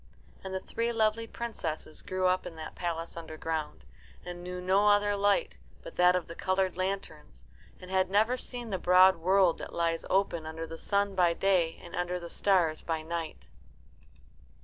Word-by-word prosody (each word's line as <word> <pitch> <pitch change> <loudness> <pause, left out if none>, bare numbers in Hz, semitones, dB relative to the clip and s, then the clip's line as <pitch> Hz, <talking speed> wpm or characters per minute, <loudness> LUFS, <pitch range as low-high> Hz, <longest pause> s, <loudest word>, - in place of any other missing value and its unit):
And 190 - -6
the 190 - -2
three 230 +5 -2
lovely 225 0 +1
princesses 165 -11 -4
grew 185 0 -2
up 185 0 +2
in 165 - -9
that 160 -1 -8
palace 170 -1 -4
underground, 160 - -5 0.4
and 175 0 -7
knew 180 0 -5
no 190 +3 +3
other 205 0 +4
light 205 - +1 0.2
but - - -10
that 180 0 +5
of 180 - -1
the 170 - -7
coloured 185 +1 0
lanterns, 180 - -5 0.3
and 185 0 -11
had 190 -1 +2
never 215 +5 +3
seen 245 -2 -5
the 190 - -1
broad 185 +1 +6
world 185 +1 +3
that - - -8
lies 165 -1 0
open 180 -4 +1
under 160 +1 -5
the 165 0 -8
sun 200 -1 0
by 175 -3 +3
day 180 -4 +1
and 170 - -9
under 180 0 -2
the 170 -1 -8
stars 175 -6 +2
by 160 -2 -3
night. 165 0 -5
180 Hz, 175 wpm, -30 LUFS, 165-195 Hz, 0.4 s, broad